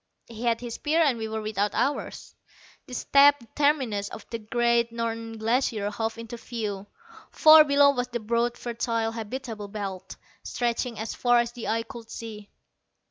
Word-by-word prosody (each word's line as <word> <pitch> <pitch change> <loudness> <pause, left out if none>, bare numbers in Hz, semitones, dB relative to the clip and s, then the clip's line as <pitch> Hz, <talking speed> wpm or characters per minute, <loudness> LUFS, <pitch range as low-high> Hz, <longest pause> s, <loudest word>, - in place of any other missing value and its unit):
He 230 +1 -7
had 230 -1 +1
his 240 -2 -6
spear 310 +6 0
and 265 -6 +1
we 220 - -3
were 220 0 -4
without 210 -1 -1
ours. 280 +2 -2 0.5
The 250 - -7
steep 280 +2 +5 0.2
terminus 260 -9 +1
of - - -10
the 230 - -3
great 235 +1 +1
Northern 230 -1 -4
Glacier 220 -2 0
hove 225 +2 -3
into 230 +1 -7
view. 210 -5 -5 0.4
Far 310 0 +8
below 285 -1 +5
was 250 -2 -2
the 240 -1 -4
broad 235 +2 0
fertile 230 -1 -2
habitable 225 -1 -6
belt, 200 -3 -6 0.3
stretching 240 -1 -2
as 220 +1 -4
far 245 -1 +3
as 235 0 +1
the 240 -1 -7
eye 225 +1 0
could 230 -1 -11
see. 215 -3 -8
230 Hz, 165 wpm, -26 LUFS, 220-245 Hz, 0.5 s, Far